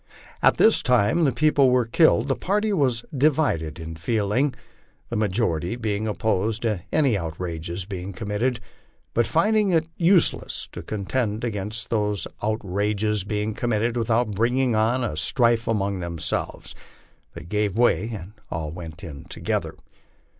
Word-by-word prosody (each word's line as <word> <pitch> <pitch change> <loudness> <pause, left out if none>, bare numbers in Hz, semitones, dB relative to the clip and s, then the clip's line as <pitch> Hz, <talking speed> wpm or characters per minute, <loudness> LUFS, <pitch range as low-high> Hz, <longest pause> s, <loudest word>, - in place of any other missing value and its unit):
At - - +4
the 225 - +6
time 125 - +3
these 135 -4 +1
people 145 -1 +4
were 125 -1 +3
killed, 160 +8 +4
the - - +1
party 210 +2 0
was 130 -9 +1
divided 135 - +1
in 80 0 -6
feeling, 110 - 0 0.5
the 120 - -3
ma 105 -1 +2
jority 90 0 -1
being 110 -1 -1
opposed 110 +1 0
to 105 -6 0
any 140 -7 +3
outrages 85 0 -4
being 95 -1 -6
committed; 110 +5 -2 0.5
but 120 -1 +2
finding 205 - +3
it 165 -3 +2
useless 175 0 +2
to - - -7
contend 110 +1 -2
against 110 0 -3
these 105 -5 0 0.2
outrages 105 0 -1
being 105 +2 -2
committed 115 +1 0
without 115 -1 +1
bringing 120 +4 +1
on 115 +4 +2
a 110 - -2
strife 115 - +2
among 100 -3 0
themselves, 85 -2 -3 0.6
they - - -8
gave 105 +3 -1
way 120 -1 +3
and 105 -2 -7 0.2
all 80 -2 -3
went 80 0 -8
in 75 -5 -8
together. - - -3
110 Hz, 145 wpm, -24 LUFS, 95-125 Hz, 0.6 s, the